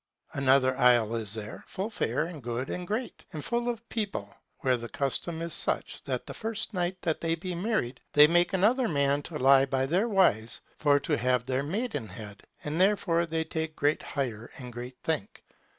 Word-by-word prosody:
Another 130 -1 +4
isle 120 -3 +5
is 110 -2 -2
there, 105 -1 -6
full 200 +4 -4
fair 130 - 0
and 165 -3 -7
good 120 +2 -3
and 180 0 -4
great, 230 +5 -3
and 150 -2 -5
full 240 0 0
of 235 -1 -5
people, 195 - -3 0.3
where 130 -1 +3
the 120 -1 -6
custom 145 +4 -2
is 170 -1 -3
such, - - -1
that - - -2
the - - -7
first 220 0 -3
night 180 0 -1
that 160 -2 0
they 165 0 +1
be 180 +2 -5
married, 170 - -1
they 150 0 +9
make 175 +3 +3
another 225 +7 +3
man 140 -3 +2
to 155 +1 -6
lie 135 0 +6
by 130 0 +1
their 185 - +1
wives 145 - +2 0.2
for 145 -2 +4
to - - 0
have 125 0 +1
their 130 +1 0
maidenhead: 115 - -4 0.2
and 155 +4 -1
therefore 185 -4 +3
they 160 0 -1
take 160 0 -4
great 145 +2 +1
hire 120 -5 -4
and 125 -2 -8
great 125 +1 -7
thank. 155 -11 -2
150 Hz, 190 wpm, -29 LUFS, 125-180 Hz, 0.3 s, they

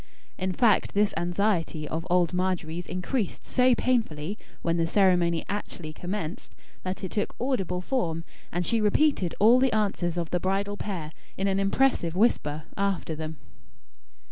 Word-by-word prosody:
In 185 0 -2
fact 215 +1 +3
this 205 0 +3
anxiety 175 -4 0
of 165 +3 -4
old 175 -1 +3
Margery's 180 -2 -1
increased 185 +4 -2
so 250 -1 +4
painfully 205 -10 0 0.3
when 170 0 +1
the 165 0 +1
ceremony 175 -3 +3
actually 175 -6 -5
commenced, 175 -1 -5 0.3
that 185 +2 -4
it 190 - -3
took 210 - -2
audible 195 -9 -1
form; 175 -8 -1 0.3
and 175 +1 -1
she 230 +3 +2
repeated 210 - +2
all 230 +5 +7
the 260 -1 +3
answers 190 -5 0
of 170 -2 -2
the 180 - +1
bridal 195 +3 -1
pair, 180 -7 -4 0.3
in 195 - 0
an 195 0 +1
impressive 195 -4 +2
whisper, 155 -8 +2
after 195 -4 -1
them. 155 0 -6
185 Hz, 150 wpm, -27 LUFS, 170-210 Hz, 0.3 s, all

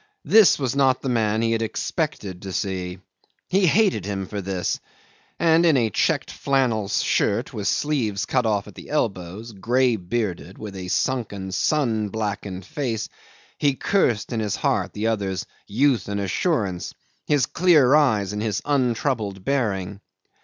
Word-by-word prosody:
This 220 -2 +6
was 135 -2 -2
not 135 -2 +3
the 135 - -1
man 110 -2 +1
he 115 - +1
had 115 0 0
expected 110 - -3
to 95 -2 -6
see. 95 -3 -3 0.5
He 190 0 +3
hated 195 - +3
him 95 -1 -3
for 100 +2 -5
this 95 -1 -2 0.6
and 165 0 +4
in 160 -5 +5
a 115 -3 +1
checked - - 0
flannel 125 -7 0
shirt - - 0
with 100 -3 -3
sleeves 115 -8 0
cut 125 -3 +1
off 105 -2 0
at 105 - -11
the - - -12
elbows, 105 - -2
grey 120 +4 +1
bearded, 95 -2 -3
with 105 -2 -8
a 90 -1 -6
sunken, 100 -3 -1
sun 110 -1 +1
blackened 100 -3 -4
face 115 -2 -3 0.5
he 140 -2 +2
cursed 125 - +1
in 115 - -1
his 105 -2 -1
heart - - 0
the 105 - -3
other's 100 -4 -1 0.2
youth 120 0 +2
and 100 0 -2
assurance, 100 - -1 0.3
his 145 -4 +3
clear 155 -5 +4
eyes 110 -10 +3
and 105 - -3
his 105 -3 -1
untroubled 120 -7 0
bearing. 100 -8 -1
110 Hz, 155 wpm, -23 LUFS, 100-135 Hz, 0.6 s, This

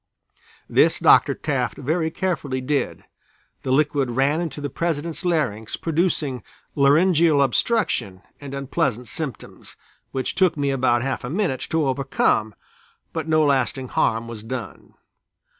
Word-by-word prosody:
This - - +3
Dr. - - +5
Taft - - -2
very 160 +3 -1
carefully 160 -7 -2
did, 140 +2 -2 0.6
the - - -5
liquid 145 -1 +2
ran 135 +6 +1
into 160 -4 -4
the 145 - -3
President's 165 +3 -3
larynx 135 - -1
producing 160 -6 -1 0.3
laryngeal 155 +2 +4
obstruction 140 - 0 0.2
and 140 -1 -7
unpleasant 125 -3 -1
symptoms, 135 0 -7 0.4
which 130 -1 -2
took 185 -4 +2
me 140 -1 0
about 125 -3 +2
half 135 0 -2
a 125 - -4
minute 170 -5 -1
to 160 -2 +1
overcome, 130 -5 0 0.6
but 160 -1 -3
no 155 -1 +3
lasting 130 -2 0
harm 115 +1 0
was 115 -2 -7
done. 115 0 -7
140 Hz, 130 wpm, -23 LUFS, 130-160 Hz, 0.6 s, Dr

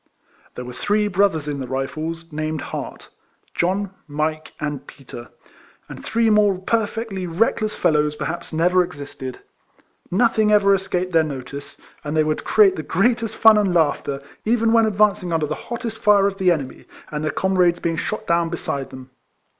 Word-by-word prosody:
There 125 - -6
were 125 - -8
three 210 +8 0
brothers 190 -6 +1
in 145 -1 -3
the 130 - -5
Rifles, 155 +5 -4
named 155 0 -3
Hart, - - -7 0.2
— - - -40
John, 190 +3 0 0.2
Mike, 155 +1 -2
and 145 -2 -4
Peter, 120 -3 -11 0.3
— - - -29
and - - -10
three 230 0 +1
more 205 -2 +4
perfectly 210 -1 -2
reckless 215 +4 0
fellows, 150 -1 +1
per - - -4
haps, 170 +1 -5
never 180 +3 +3
existed. 140 -5 -8 0.7
Nothing 220 +1 +2
ever 200 -1 +5
escaped 185 -1 -1
their 165 - +5
notice; 140 -1 -7 0.2
and 150 +1 -3
they 155 - +4
would 155 0 -1
create 200 -3 +4
the - - -2
greatest 225 +7 0
fun 220 -1 +7
and 195 -4 +1
laughter, 145 -3 0 0.2
even 230 0 +2
when 225 -1 +5
ad 210 - -2
vancing 200 -4 +2
under 160 -2 +1
the 150 - -3 0.2
hottest 235 -2 -4
fire 205 -1 +4
of 200 0 -1
the 185 -1 +3
enemy, 145 -7 -2 0.3
and 150 0 -3
their 155 - 0
comrades 180 -2 +2
being 165 -1 -2
shot 215 +6 -3
down 170 -2 +1
beside 140 -5 -4
them. 130 0 -11
175 Hz, 180 wpm, -21 LUFS, 150-205 Hz, 0.7 s, fun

